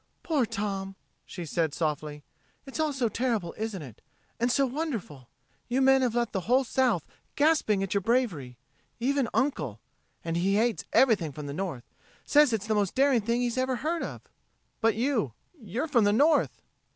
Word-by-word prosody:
"Poor 290 -8 +1
Tom!" 200 -3 -3 0.3
she 175 -3 -7
said 160 -1 -1
softly. 150 -2 -3 0.4
"It's 270 +3 -7
all 310 -1 +1
so 265 -4 0
terrible, 220 -6 -1
isn't 215 -6 -4
it? 120 -6 -12 0.4
And 240 +2 +2
so 275 +2 +3
wonderful! 240 - -4 0.4
You 250 +2 +1
men 270 0 +5
have 245 -3 0
left 235 -2 0
the 195 - 0
whole 260 +2 +5
South 245 - +1 0.3
gasping 285 -10 +3
at 195 - -2
your 200 - +1
bravery. 180 - 0 0.4
Even 265 0 +1
Uncle 150 - -1 0.5
and 165 0 -1
he 195 +3 +2
hates 215 -9 +1
everything 210 - +3
from 150 +2 -8
the 140 - -5
North 160 -7 -4 0.4
says 295 -2 +5
it's 215 -3 -1
the 220 - 0
most 205 -3 0
daring 270 -3 +4
thing 235 +3 0
he's 245 +1 -1
ever 260 0 0
heard 320 +7 -2
of." - - -6 0.6
"But 225 -1 +2
you 225 - 0 0.2
you're 250 - -4
from 240 -8 +3
the 205 - +3
North." 295 +7 +2
225 Hz, 175 wpm, -28 LUFS, 180-265 Hz, 0.6 s, men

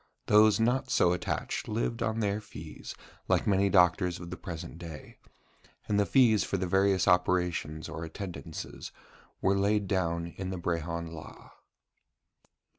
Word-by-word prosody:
Those 105 +1 +5
not 125 +4 +1
so 90 -7 +3
attached 90 - -3
lived 115 +2 -2
on 115 0 0
their 105 0 0
fees, 105 - -9 0.3
like - - +2
many 100 -1 +3
doctors 90 0 +3
of 85 0 -8
the - - -4
present 85 -2 -8
day: 80 -4 -10 0.7
and 105 -1 +1
the 100 - +2
fees 115 -6 +4
for 100 - -2
the 95 - -1
various 95 0 +2
operations 90 -4 +1
or 80 - -6
attendances 85 -1 -7 0.5
were 95 - +3
laid 100 +1 +2
down 85 -3 0
in 95 +2 -6
the 95 - -4
Brehon 85 -1 -3
Law. 80 -2 -11
95 Hz, 145 wpm, -29 LUFS, 85-105 Hz, 0.7 s, Those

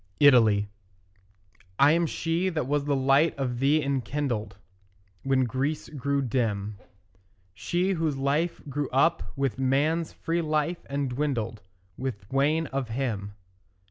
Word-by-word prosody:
ITALY 115 -8 +5 1.1
I 140 +2 +6
am 170 +1 +2
she 170 +4 -1
that 155 -7 -2
was 145 +1 0
the 145 -1 +1
light 135 +4 +3
of 125 -3 -2
thee 145 +3 +3
enkindled 135 -4 -2 0.6
When 135 -1 +2
Greece 135 +5 -2
grew 140 -1 -1
dim; 105 -5 -1 0.7
She 175 - -1
whose 160 -6 -1
life 145 +5 0
grew 140 0 -2
up 165 +6 +3
with 135 -2 -1
man's 150 +5 +1
free 170 +1 -2
life, 155 +2 -1
and 140 0 -1
dwindled 120 -5 -2 0.4
With 125 -7 -4
wane 150 +4 +2
of 135 -3 -3
him. 110 -5 -3
140 Hz, 130 wpm, -27 LUFS, 125-155 Hz, 1.1 s, I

